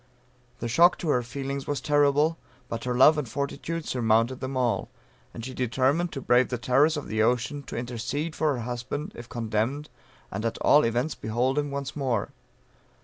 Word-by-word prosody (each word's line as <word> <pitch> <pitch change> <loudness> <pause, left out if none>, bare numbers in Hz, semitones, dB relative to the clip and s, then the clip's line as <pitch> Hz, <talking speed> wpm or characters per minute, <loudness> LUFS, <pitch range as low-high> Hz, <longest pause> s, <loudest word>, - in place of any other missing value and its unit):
The 120 - -2
shock 170 +9 +5
to 165 - -3
her 125 -4 +3
feelings 135 +3 -5
was 145 -2 -1
terrible, 145 +3 +2 0.3
but 115 +1 -4
her 125 -1 -1
love 150 +4 +7
and 135 -6 -4
fortitude 150 +5 -3
surmounted 115 +1 +1
them 130 0 -4
all; 125 -2 0 0.4
and 115 - -7
she 130 - -6
determined 135 +8 +1
to 135 - -4
brave 125 0 +3
the 125 - -2
terrors 140 +6 +3
of 145 - -5
the 110 +2 0
ocean, 125 +5 +1
to 140 - -7
intercede 125 +7 -3
for 155 -3 +1
her 120 - -4
husband 125 +5 -4
if 120 0 -10
condemned, 120 +6 -2 0.4
and 100 +3 -4
at 115 0 -1
all 150 - +5
events 120 +6 0
behold 125 +6 0
him 145 -1 -2
once 140 -1 -4
more. 130 -7 -1
130 Hz, 185 wpm, -26 LUFS, 120-145 Hz, 0.4 s, love